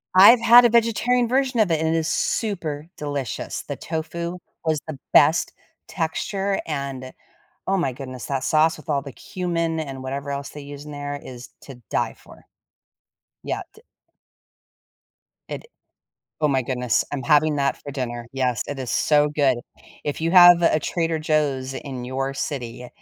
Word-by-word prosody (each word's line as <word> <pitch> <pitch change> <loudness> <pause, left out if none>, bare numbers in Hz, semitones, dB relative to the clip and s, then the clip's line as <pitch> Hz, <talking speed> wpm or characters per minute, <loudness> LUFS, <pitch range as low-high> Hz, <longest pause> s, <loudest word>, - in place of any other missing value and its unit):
I've 215 +6 +9
had 235 +1 +8
a 240 - +6
vegetarian 235 +2 +2
version 255 -1 +1
of 185 -5 +2
it 160 - +2
and 160 +1 +1
it - - +2
is 160 0 -1
super 165 -8 -2
delicious. 145 -5 -4
The - - -6
tofu 170 +2 -4 0.3
was 160 -2 +1
the 150 -3 -6 0.2
best 155 +3 +5 0.3
texture 195 +4 -2
and, 135 -4 -4 0.5
oh 195 - +2
my 155 -8 0
goodness, 130 -3 -8
that 135 -1 -2
sauce 160 +1 +3
with 155 - -15
all 140 - 0
the 140 -2 -9
cumin 170 -1 -2
and 135 -4 -6
whatever 140 +2 -4
else 140 0 -4
they 150 - -9
use 145 0 -9
in 150 - -9
there 145 0 -5
is 125 -1 -10
to 125 -4 -12
die - - 0
for. - - -17 1.0
Yeah, - - -3
t 440 - -17 1.7
It - - -6 0.8
Oh 150 - +3
my 135 -2 +1
goodness, 125 -2 0
I'm 135 -2 -3
having 155 0 +3
that 140 -1 +1
for 145 - -8
dinner. 120 -3 -4
Yes, 125 -3 0
it 145 - -5
is 130 - -4
so 150 -1 +3
good. 140 -4 +2 0.5
If 145 +1 -3
you 165 +2 0
have 175 -1 +9
a 165 -2 +3
Trader 165 +1 -1
Joe's 145 -4 0
in 130 -2 -6
your 135 +2 -3
city, 125 -3 -5
150 Hz, 165 wpm, -23 LUFS, 135-170 Hz, 1.7 s, I've